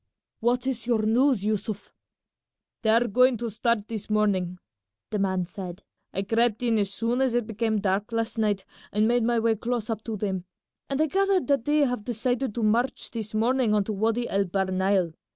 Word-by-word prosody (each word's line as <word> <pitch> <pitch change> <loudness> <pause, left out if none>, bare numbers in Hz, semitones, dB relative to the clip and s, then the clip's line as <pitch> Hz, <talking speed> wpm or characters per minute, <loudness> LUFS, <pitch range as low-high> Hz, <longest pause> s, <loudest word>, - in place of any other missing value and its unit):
"What 245 +2 +1
is 250 -3 -3
your 230 -3 +2
news, 235 -1 +3
Yussuf?" 210 -1 -3 0.9
"They 220 - +1
are 230 +2 +4
going 250 +3 +4
to 230 0 -4
start 220 0 0
this 220 -2 -6
morning," 195 -4 +1 0.5
the 210 - -1
man 190 -2 0
said. 180 0 -8 0.3
"I 195 - -2
crept 225 +2 +1
in 230 -2 +2
as 200 -1 0
soon 230 +5 0
as 260 -3 +1
it 240 -2 +1
became 220 0 -1
dark 200 +2 0
last 230 0 -2
night 205 -3 0 0.3
and 210 +1 +2
made 240 +1 +3
my 235 +1 +2
way 225 0 +2
close 230 0 -2
up 220 -1 -4
to 225 -2 -3
them, 190 -3 -2 0.4
and 275 0 -1
I 310 - +4
gathered 390 +3 +2
that 275 -4 +2
they 300 +1 +3
have 245 -5 -2
decided 245 +1 -1
to 235 - -1
march 235 +4 0
this 220 -2 -5
morning 235 0 +2
on 205 - +3
to 215 - -3
Wady 225 +4 0
El 200 0 +1
Bahr 190 +1 -1
Nile. 190 -2 +1
220 Hz, 200 wpm, -26 LUFS, 205-240 Hz, 0.9 s, are